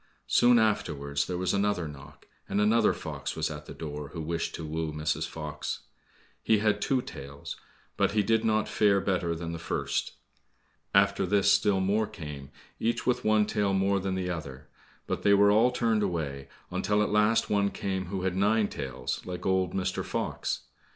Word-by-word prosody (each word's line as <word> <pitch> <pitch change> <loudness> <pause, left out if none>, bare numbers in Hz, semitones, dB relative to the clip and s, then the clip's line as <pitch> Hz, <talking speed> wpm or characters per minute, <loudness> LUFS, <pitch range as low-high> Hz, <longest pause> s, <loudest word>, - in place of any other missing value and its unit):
Soon 120 0 +5
afterwards 70 -10 0
there 90 - -2
was 90 0 0
another 100 -4 +1
knock, 70 0 -12 0.2
and 100 - 0
another 110 +1 +4
fox - - -5
was - - -1
at - - -8
the - - -7
door 75 -2 -6
who 85 - -4
wished 85 +1 -2
to 80 - -6
woo 80 0 -2
Mrs. 75 0 -1
Fox. 75 -1 -5 0.6
He 110 - +3
had 105 0 +1
two 130 -2 +1
tails, 70 +1 -8 0.4
but - - +2
he 105 -1 +3
did 110 +2 +2
not 110 -1 +2
fare 100 -2 +3
better 90 -3 0
than 85 0 -5
the 85 - -5
first. - - -2 0.8
After 100 0 +3
this 100 +1 +4
still 100 -1 +3
more 105 +3 +1
came, 75 -3 -8 0.3
each 115 +1 0
with 125 0 +1
one 110 -1 +4
tail 105 -2 0
more 100 +1 +2
than 95 0 -2
the 90 -1 -2
other, 70 -4 -7 0.4
but - - -3
they 100 0 +5
were 100 +1 +6
all 110 +4 +5
turned 115 -3 +1
away, 75 -8 -2 0.2
until 105 +3 +1
at - - -1
last 105 +2 +3
one 100 -1 +3
came 95 -2 -3
who 95 0 -3
had 95 -1 0
nine 105 +2 +2
tails, 65 -3 -4
like 90 -1 -6
old 95 -2 +1
Mr. 95 -1 -1
Fox. - - -2
95 Hz, 185 wpm, -28 LUFS, 80-105 Hz, 0.8 s, were